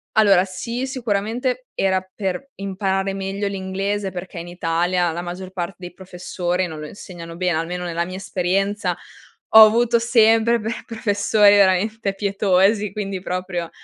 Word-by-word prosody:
Allora 200 Hz, -4 st, +5 dB
sì 235 Hz, +7 st, -4 dB
sicuramente 245 Hz, +1 st, -2 dB
era 190 Hz, -1 st, +1 dB
per 195 Hz, +6 st, -4 dB
imparare 195 Hz, 0 st, -2 dB
meglio 195 Hz, +1 st, -3 dB
l'inglese 195 Hz, +1 st, -3 dB
perché 180 Hz, 0 st, -8 dB
in 170 Hz, -, -8 dB
Italia 175 Hz, 0 st, 0 dB
la 170 Hz, +2 st, -4 dB
maggior 180 Hz, +1 st, -6 dB
parte 185 Hz, 0 st, -5 dB
dei 180 Hz, -1 st, -8 dB
professori 180 Hz, -1 st, -3 dB
non 155 Hz, -2 st, -8 dB
lo 150 Hz, -, -6 dB
insegnano 170 Hz, -1 st, -10 dB
bene. 180 Hz, -2 st, 0 dB
Almeno 175 Hz, +2 st, -3 dB
nella 170 Hz, 0 st, -2 dB
mia 185 Hz, +1 st, -7 dB
esperienza, 195 Hz, +2 st, -1 dB, 0.5 s
ho 220 Hz, 0 st, +10 dB
avuto 235 Hz, +2 st, +3 dB
sempre 230 Hz, 0 st, +4 dB
per 220 Hz, +1 st, -4 dB
professori 210 Hz, -2 st, +3 dB
veramente 200 Hz, +1 st, +2 dB
pietosi. 200 Hz, +1 st, +2 dB
Quindi 195 Hz, -2 st, -4 dB
proprio 180 Hz, -2 st, -3 dB
195 Hz, 145 wpm, -21 LUFS, 180-210 Hz, 0.5 s, ho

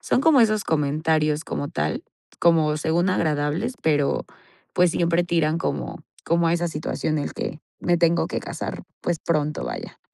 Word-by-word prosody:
son -, -, +1 dB
como 295 Hz, -2 st, +5 dB
esos 215 Hz, -2 st, +3 dB
comentarios 155 Hz, 0 st, +1 dB
como 145 Hz, -, -3 dB
tal, 75 Hz, -, -2 dB, 0.4 s
como 160 Hz, -3 st, +4 dB
según 170 Hz, +4 st, +1 dB
agradables, 155 Hz, -, 0 dB
pero, 145 Hz, -3 st, +1 dB, 0.5 s
pues, 180 Hz, -1 st, +4 dB
siempre 170 Hz, 0 st, +2 dB
tiran 165 Hz, -2 st, +1 dB
como -, -, -3 dB, 0.2 s
como 170 Hz, 0 st, +2 dB
a -, -, +2 dB
esa 175 Hz, 0 st, 0 dB
situación 155 Hz, 0 st, -2 dB
el 145 Hz, -, -3 dB
que 150 Hz, -, -4 dB, 0.2 s
me 175 Hz, 0 st, +2 dB
tengo 170 Hz, 0 st, +3 dB
que -, -, -2 dB
casar, -, -, -5 dB, 0.2 s
pues, 175 Hz, -2 st, -1 dB
pronto, 150 Hz, -2 st, 0 dB
vaya. -, -, -6 dB
160 Hz, 160 wpm, -24 LUFS, 150-175 Hz, 0.5 s, como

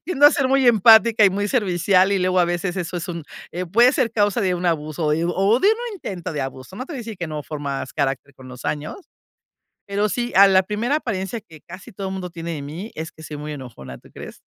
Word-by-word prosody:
tiendo 290 Hz, -4 st, +5 dB
a 295 Hz, -, +8 dB
ser 280 Hz, -4 st, +1 dB
muy 270 Hz, -1 st, +3 dB
empática 225 Hz, 0 st, +6 dB
y 195 Hz, -, +6 dB
muy 205 Hz, +2 st, -2 dB
servicial, 190 Hz, -4 st, +2 dB
y 195 Hz, -, +2 dB
luego 185 Hz, 0 st, +1 dB
a -, -, +4 dB
veces 175 Hz, +1 st, -2 dB
eso, 180 Hz, -1 st, -3 dB
es 175 Hz, +2 st, -5 dB
un 170 Hz, -3 st, -5 dB, 0.3 s
eh, 180 Hz, +1 st, -4 dB
puede 235 Hz, +8 st, +5 dB
ser 255 Hz, -6 st, +1 dB
causa 205 Hz, +1 st, +1 dB
de 185 Hz, -2 st, +1 dB
un 175 Hz, +1 st, -5 dB
abuso, 155 Hz, -1 st, 0 dB
y 165 Hz, -, -1 dB
o 195 Hz, +6 st, +2 dB
de 400 Hz, -, +4 dB
un 455 Hz, 0 st, -1 dB
intento 185 Hz, -, -6 dB
de 145 Hz, -, -3 dB
abuso. 135 Hz, +6 st, -7 dB
No 255 Hz, +5 st, -6 dB
te -, -, -8 dB
voy -, -, -5 dB
a -, -, -4 dB
decir 225 Hz, -3 st, -7 dB
que 175 Hz, -, -3 dB
no 150 Hz, -1 st, -5 dB
formas 140 Hz, -3 st, -5 dB
carácter 140 Hz, -1 st, -2 dB
con 130 Hz, -1 st, -14 dB
los 125 Hz, -1 st, -11 dB
años, 155 Hz, -, -5 dB, 0.8 s
pero 200 Hz, +1 st, 0 dB
sí, 240 Hz, +5 st, -2 dB
a 200 Hz, 0 st, +9 dB
la 190 Hz, -1 st, +4 dB
primera 220 Hz, +8 st, -1 dB
apariencia 205 Hz, -4 st, -4 dB
que 160 Hz, -7 st, -16 dB
casi 185 Hz, +6 st, -12 dB
todo 195 Hz, 0 st, -5 dB
mundo 185 Hz, -2 st, -5 dB
tiene 170 Hz, 0 st, -6 dB
de 145 Hz, -, -5 dB
mí 165 Hz, +10 st, -7 dB
es 160 Hz, 0 st, -6 dB
que 160 Hz, -, -15 dB
soy 150 Hz, -, -7 dB
muy 150 Hz, +1 st, -6 dB
enojona, 70 Hz, -, -9 dB
¿tú -, -, -19 dB
crees? -, -, -11 dB
185 Hz, 255 wpm, -21 LUFS, 160-220 Hz, 0.8 s, a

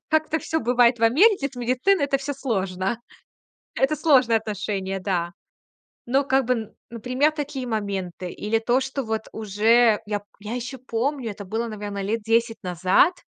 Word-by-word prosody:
Как-то 315 Hz, 0 st, +1 dB
всё 320 Hz, -, -2 dB
бывает 240 Hz, 0 st, +3 dB
в -, -, -7 dB
Америке 290 Hz, -, +4 dB
с 255 Hz, -, -17 dB
медициной- 255 Hz, +8 st, +2 dB
это 275 Hz, -1 st, +1 dB
всё 285 Hz, +1 st, -4 dB
сложно. 195 Hz, -5 st, -2 dB, 0.8 s
Это 270 Hz, +3 st, +2 dB
сложные 260 Hz, -7 st, +4 dB
отношения, 195 Hz, -3 st, -3 dB
да. 175 Hz, -3 st, -1 dB, 0.8 s
Ну, 270 Hz, +3 st, +2 dB
как 265 Hz, 0 st, +2 dB
бы, 230 Hz, -4 st, -2 dB, 0.2 s
например, 255 Hz, +6 st, +1 dB
такие 285 Hz, -4 st, -4 dB
моменты. 195 Hz, -5 st, -3 dB
Или 215 Hz, +2 st, -1 dB
то, 240 Hz, +3 st, +1 dB
что 265 Hz, 0 st, -3 dB
вот 220 Hz, 0 st, -2 dB
уже 220 Hz, +2 st, +3 dB
я 205 Hz, -1 st, -1 dB
п -, -, -27 dB, 0.2 s
я 215 Hz, +3 st, -5 dB
ещё 250 Hz, +2 st, -5 dB
помню. 255 Hz, 0 st, -2 dB
Это 200 Hz, 0 st, -8 dB
было, 225 Hz, +4 st, -3 dB
наверно, 205 Hz, -2 st, -5 dB
лет 220 Hz, +3 st, -2 dB
10 225 Hz, +1 st, +1 dB
назад. 185 Hz, -, +3 dB
230 Hz, 165 wpm, -24 LUFS, 205-265 Hz, 0.8 s, Америке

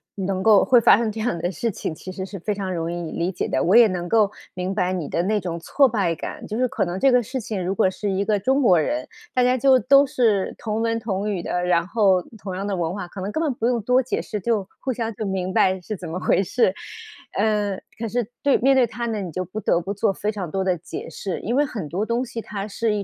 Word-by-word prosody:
能 190 Hz, -1 st, -2 dB
够 215 Hz, -2 st, +6 dB
会 250 Hz, -2 st, +5 dB
发 220 Hz, -, +6 dB
生 225 Hz, -2 st, 0 dB
这 220 Hz, -, -7 dB
样 220 Hz, -6 st, -1 dB
的 175 Hz, +3 st, -2 dB
事 230 Hz, +7 st, -2 dB
情， 160 Hz, -, -4 dB
其 185 Hz, +4 st, -9 dB
实 190 Hz, 0 st, -5 dB
是 195 Hz, -1 st, -8 dB
非 210 Hz, +4 st, -2 dB
常 190 Hz, -2 st, -3 dB
容 165 Hz, 0 st, -2 dB
易 175 Hz, -2 st, -4 dB
理 175 Hz, +3 st, -1 dB
解 -, -, -2 dB
的。 -, -, +1 dB
我 185 Hz, +6 st, +3 dB
也 235 Hz, -2 st, +8 dB
能 175 Hz, -2 st, -3 dB
够 210 Hz, 0 st, +3 dB, 0.2 s
明 185 Hz, +1 st, -3 dB
白 185 Hz, -2 st, 0 dB
你 170 Hz, -5 st, -3 dB
的 170 Hz, -, 0 dB
那 210 Hz, +2 st, +1 dB
种 170 Hz, -1 st, -4 dB
挫 275 Hz, -, +3 dB
败 190 Hz, -7 st, 0 dB
感。 -, -, -7 dB
就 215 Hz, -, -4 dB
是 255 Hz, 0 st, +2 dB
可 -, -, 0 dB
能 175 Hz, +2 st, -4 dB
这 270 Hz, -, +4 dB
个 250 Hz, 0 st, +5 dB
事 260 Hz, +4 st, -4 dB
情 205 Hz, -4 st, -4 dB
如 190 Hz, +2 st, -1 dB
果 185 Hz, -, +3 dB
是 205 Hz, +2 st, -4 dB
一 195 Hz, +1 st, 0 dB
个 210 Hz, -1 st, +1 dB
中 265 Hz, +7 st, +2 dB
国 185 Hz, -9 st, +5 dB
人， 300 Hz, -, -1 dB, 0.3 s
大 250 Hz, -, +3 dB
家 250 Hz, +1 st, +3 dB
就 265 Hz, +1 st, +5 dB
都 275 Hz, +2 st, +5 dB
是 220 Hz, -7 st, +1 dB
同 220 Hz, 0 st, -3 dB
文 230 Hz, 0 st, 0 dB
同 210 Hz, -2 st, -2 dB
语 180 Hz, -4 st, -2 dB
的， 180 Hz, 0 st, -1 dB
然 170 Hz, -1 st, +2 dB
后 195 Hz, -4 st, +3 dB, 0.2 s
同 190 Hz, -2 st, -5 dB
样 195 Hz, +2 st, -3 dB
的 200 Hz, -2 st, -1 dB
文 170 Hz, 0 st, -1 dB
化， 195 Hz, -3 st, -5 dB
可 195 Hz, -, -9 dB
能 195 Hz, -, -3 dB
根 320 Hz, -, -1 dB
本 290 Hz, -, 0 dB
不 235 Hz, -1 st, -3 dB
用 240 Hz, -3 st, +1 dB
多 250 Hz, +4 st, +3 dB
解 255 Hz, -, -2 dB
释， 210 Hz, -, -5 dB
就 205 Hz, -1 st, -1 dB
互 260 Hz, -1 st, -2 dB
相 225 Hz, -1 st, -3 dB
就 215 Hz, -, -4 dB
明 185 Hz, -1 st, -2 dB
白 190 Hz, 0 st, +3 dB
是 210 Hz, +2 st, -5 dB
怎 170 Hz, -2 st, -7 dB
么 170 Hz, -, -4 dB
回 195 Hz, -, +2 dB
事。 195 Hz, -1 st, +2 dB, 0.6 s
呃， 205 Hz, -2 st, +1 dB, 0.2 s
可 230 Hz, -, -2 dB
是 235 Hz, 0 st, -1 dB, 0.2 s
对 280 Hz, -, +4 dB
面 270 Hz, +2 st, +4 dB
对 245 Hz, -2 st, +4 dB
他 235 Hz, +2 st, -5 dB
呢， 220 Hz, -2 st, -2 dB
你 185 Hz, -3 st, -4 dB
就 185 Hz, +4 st, -3 dB
不 190 Hz, +5 st, -6 dB
得 175 Hz, -, +1 dB
不 195 Hz, +4 st, -4 dB
做 205 Hz, -1 st, +1 dB
非 210 Hz, +2 st, -2 dB
常 190 Hz, -6 st, -5 dB
多 190 Hz, +2 st, -1 dB
的 185 Hz, -2 st, +1 dB
解 170 Hz, -, -7 dB
释。 190 Hz, -3 st, -4 dB
因 235 Hz, +4 st, -2 dB
为 290 Hz, -, +4 dB
很 200 Hz, -, -6 dB
多 195 Hz, +6 st, -1 dB
东 235 Hz, +3 st, -1 dB
西 235 Hz, -1 st, -6 dB
它 200 Hz, -2 st, -5 dB
是 215 Hz, +1 st, -1 dB
一 205 Hz, -, -2 dB
205 Hz, 300 characters per minute, -23 LUFS, 185-230 Hz, 0.6 s, 也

